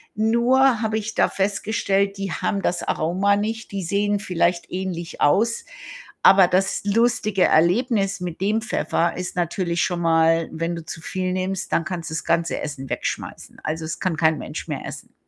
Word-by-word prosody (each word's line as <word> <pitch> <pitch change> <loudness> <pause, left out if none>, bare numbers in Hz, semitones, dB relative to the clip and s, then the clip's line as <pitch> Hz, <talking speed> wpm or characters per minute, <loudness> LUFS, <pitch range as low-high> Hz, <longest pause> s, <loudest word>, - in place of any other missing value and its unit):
nur 235 +3 +3
habe 220 -1 0
ich 220 +1 -4
da - - +3
festgestellt, 200 0 0
die 195 -2 -3
haben 200 - -1
das 180 - -1
Aroma 190 +5 +1
nicht, 220 +2 -3
die 195 -1 -3
sehen 205 +3 0
vielleicht 175 -2 0
ähnlich 180 -2 -5
aus, 225 +10 +3 0.6
aber 190 -2 +7
das 190 +2 +1
lustige 215 -2 +2
Erlebnis 195 +3 +2
mit 175 -1 -6
dem 215 +3 +1
Pfeffer 170 -6 0
ist 180 0 -4
natürlich 170 0 -1
schon 175 -2 -1
mal, 165 0 +3
wenn 165 +2 -3
du 165 - -7
zu 160 - -6
viel 185 +2 -3
nimmst, 185 0 -2
dann 165 - +1
kannst 170 -3 -4
du 160 - -4
das - - -3
ganze 170 0 0
Essen 135 -3 -6
wegschmeißen. - - -5
Also, 160 +1 -3
es 155 - -4
kann 180 -4 -1
kein 160 -2 +3
Mensch - - -7
mehr - - -4
essen. - - -8
190 Hz, 175 wpm, -22 LUFS, 170-205 Hz, 0.6 s, aber